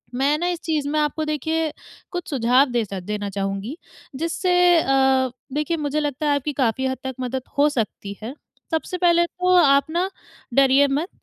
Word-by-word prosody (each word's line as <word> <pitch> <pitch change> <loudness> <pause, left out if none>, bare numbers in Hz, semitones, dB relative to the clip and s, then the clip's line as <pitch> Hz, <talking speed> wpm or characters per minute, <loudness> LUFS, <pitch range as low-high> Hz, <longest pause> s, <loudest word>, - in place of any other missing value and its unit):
मैं 280 +4 +2
ना 350 +2 -1
इस 340 - -6
चीज़ 305 -3 -1
में 305 +1 0
आपको 300 +1 0
देखिए 310 +1 -1 0.4
कुछ 355 -2 -5
सुझाव 255 0 +3
देसा 210 -5 -2
देना 205 +2 -4
चाहूँगी, 195 - -4 0.4
जिससे 335 +5 -1 0.3
अ, 265 -1 +3 0.2
देखिए 305 +3 -1
मुझे 300 0 -1
लगता 295 0 -2
है, 285 - +3
आपकी 285 +1 -2
काफ़ी 265 -1 0
हद 260 - -2
तक 265 -1 -4
मदद 255 +1 -3 0.2
हो 295 +1 +5
सकती 210 -5 -4
है। 245 +5 -5 0.4
सबसे 325 +3 -2
पहले 345 -1 +4
तो 365 +1 +1
आप 280 0 +4
ना 355 +3 0 0.4
डरिए 275 +2 +5
मत 290 +6 -1
285 Hz, 175 wpm, -22 LUFS, 255-315 Hz, 0.4 s, हो